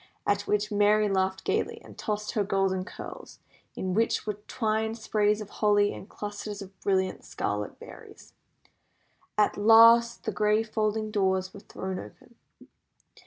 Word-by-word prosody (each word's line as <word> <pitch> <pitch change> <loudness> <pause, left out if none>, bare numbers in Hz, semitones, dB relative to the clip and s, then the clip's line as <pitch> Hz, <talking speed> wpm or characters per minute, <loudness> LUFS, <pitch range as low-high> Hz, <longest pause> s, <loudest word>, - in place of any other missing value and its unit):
At 205 0 0
which 210 0 0
Merry 210 +1 +3
laughed 190 -1 0
gaily, - - -1
and - - -13
tossed 210 -1 -3
her 210 - 0
golden 190 -1 0
curls, - - -10 0.4
in 185 -1 -3
which 225 +4 +1
were 210 - -1
twined 220 -1 -1
sprays 210 -1 +1
of 205 - -9
holly 205 -1 +3
and 200 - -10
clusters 205 0 -6
of 195 -1 -10
brilliant 190 -1 0
scarlet 105 0 -4
berries. - - -13 1.0
At 210 - +2
last 230 +2 +6
the 220 - -2
great 210 +1 +2
folding 215 0 0
doors 190 -2 0
were - - -10
thrown 190 -1 -6
open. 105 - -13
205 Hz, 145 wpm, -27 LUFS, 195-215 Hz, 1.0 s, last